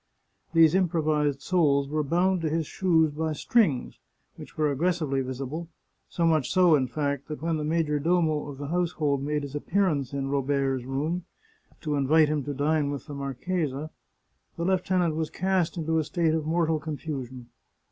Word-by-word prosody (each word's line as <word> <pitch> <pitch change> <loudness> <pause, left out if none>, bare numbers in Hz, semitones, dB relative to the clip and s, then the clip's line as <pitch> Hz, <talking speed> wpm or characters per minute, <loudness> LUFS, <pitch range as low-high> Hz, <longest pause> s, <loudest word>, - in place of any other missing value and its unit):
These 165 -1 +6
improvised 155 -6 +1
soles 145 -6 +2
were 155 +2 -1
bound 175 +5 +1
to 160 - 0
his 160 +1 -1
shoes 160 -2 +2
by 160 +1 -2
strings, 155 - +1 0.4
which - - -12
were 150 -1 +2
aggressively 155 -2 0
visible 135 +6 -5 0.2
— - - -48
so 170 - 0
much 155 -5 +2
so, 180 -3 +5
in 135 -4 +3
fact, 140 +1 -2
that 150 -1 -7
when 165 -1 0
the 150 - -3
major 155 -1 0
domo 160 -1 +1
of 140 - -8
the 145 0 -6
household 160 -5 0
made 150 +1 -1
his 140 -1 -7
appearance 150 -4 0
in 135 -1 -3
Robert's 135 -2 0
room, 155 +7 -2 0.6
to 150 -2 -2
invite 145 +2 +4
him 150 -2 -1
to 145 - -3
dine 145 +1 +1
with 145 -1 -5
the 150 - -8
marchesa, 140 +2 -3 0.7
the 170 - -2
lieutenant 180 -2 +1
was 160 -1 -2
cast 185 -2 0
into 160 0 0
a - - +1
state 165 0 0
of 160 -1 -1
mortal 160 -1 +1
confusion. 135 -5 -6
155 Hz, 175 wpm, -27 LUFS, 140-165 Hz, 0.7 s, These